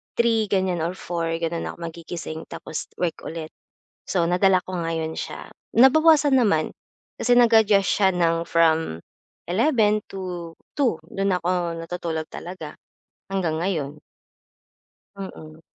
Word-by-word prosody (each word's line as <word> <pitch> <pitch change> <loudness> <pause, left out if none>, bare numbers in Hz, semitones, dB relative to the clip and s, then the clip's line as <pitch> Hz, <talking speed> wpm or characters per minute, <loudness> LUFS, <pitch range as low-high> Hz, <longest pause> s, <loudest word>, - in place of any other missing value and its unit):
3, 230 -2 +3
ganiyan 185 -4 +1
or 175 - -2
4 170 -2 -3
gano'n 165 0 -2
ako - - -16
magigising, 165 -1 -7
tapos 155 - -6 0.2
work 175 -2 0
ulit. 160 -1 -5 0.6
So, 175 -3 +2
nadala 185 +1 +4
ko 185 - -5
ngayon 165 -1 -2
siya. - - -6 0.3
Nabawasan 295 +2 +6
naman 200 -10 +2 0.5
kasi 245 +1 +4
nag-adjust 220 -4 +5
siya 195 -2 +3
ng 165 -1 +1
from 160 - +2 0.5
11 215 - +3
to 180 -3 -6 0.2
2, 245 - +2
dun 195 -1 0
ako 175 -1 -1
natutulog 165 -2 -4
talaga, 170 -4 -8 0.6
hanggang 170 -5 0
ngayon. 155 -6 -2 1.2
Mm. 160 -5 -9
175 Hz, 120 wpm, -24 LUFS, 165-200 Hz, 1.2 s, Nabawasan